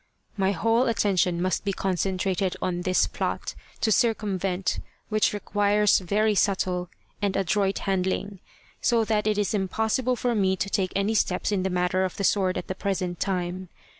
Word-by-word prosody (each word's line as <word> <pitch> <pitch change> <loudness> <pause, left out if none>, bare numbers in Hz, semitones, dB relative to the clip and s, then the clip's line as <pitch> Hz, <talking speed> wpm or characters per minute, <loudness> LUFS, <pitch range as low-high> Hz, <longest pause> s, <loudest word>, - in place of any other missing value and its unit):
My 195 -2 +1
whole 230 +5 +2
attention 185 -6 +1
must 185 +1 0
be 200 -1 -1
concentrated 190 0 -1
on 175 -1 -2
this 185 0 +2
plot, - - -3 0.3
to 220 - +2
circumvent 195 -5 0 0.3
which 215 -1 +2
requires 205 0 +2
very 210 +4 +1
subtle 185 -3 0 0.3
and 200 -2 0
adroit 195 +1 +1
handling, 190 +1 -1 0.4
so 235 -4 +3
that 215 -1 0
it 210 -1 +1
is 205 0 0
impossible 220 +6 0
for 245 0 0
me 190 -3 +2
to 200 0 -3
take 185 -2 0
any 200 +3 +1
steps 190 -2 0
in 200 -2 +1
the 190 - 0
matter 180 +1 +1
of 185 - -3
the 200 - -2
sword 190 -2 +2
at 180 - -4
the - - -2
present 185 -2 -2
time. 185 -1 -2
195 Hz, 165 wpm, -26 LUFS, 185-210 Hz, 0.4 s, so